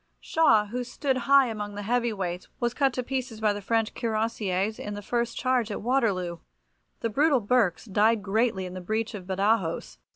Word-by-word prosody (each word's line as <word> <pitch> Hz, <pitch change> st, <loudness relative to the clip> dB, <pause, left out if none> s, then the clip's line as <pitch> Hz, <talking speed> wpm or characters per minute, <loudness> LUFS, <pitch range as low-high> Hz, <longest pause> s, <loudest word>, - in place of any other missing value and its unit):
Shaw, 225 Hz, -10 st, +3 dB
who 245 Hz, +4 st, -4 dB
stood 265 Hz, +2 st, -1 dB
high 275 Hz, -1 st, +7 dB
among 210 Hz, -3 st, -5 dB
the 205 Hz, -, -5 dB
heavy 240 Hz, +2 st, +1 dB
weights, 180 Hz, -4 st, -4 dB
was 240 Hz, 0 st, 0 dB
cut 275 Hz, 0 st, +2 dB
to 250 Hz, -, -2 dB
pieces 255 Hz, -3 st, -4 dB
by 215 Hz, -2 st, +2 dB
the 205 Hz, -, -6 dB
French 225 Hz, +2 st, 0 dB
Cuirassiers 215 Hz, -3 st, -1 dB
in 205 Hz, 0 st, -5 dB
the 205 Hz, -, -6 dB
first 235 Hz, +2 st, -1 dB
charge 255 Hz, -3 st, +1 dB
at 205 Hz, -, -5 dB
Waterloo. 200 Hz, -9 st, 0 dB, 0.6 s
The 230 Hz, -, 0 dB
brutal 285 Hz, +3 st, +3 dB
Berks 210 Hz, -5 st, +1 dB
died 215 Hz, +1 st, +2 dB
greatly 205 Hz, -1 st, +1 dB
in 180 Hz, -, -7 dB
the 185 Hz, -, -6 dB
breach 220 Hz, +5 st, -2 dB
of 190 Hz, -4 st, -8 dB
Badajos. 190 Hz, -, 0 dB
220 Hz, 190 wpm, -27 LUFS, 200-245 Hz, 0.6 s, high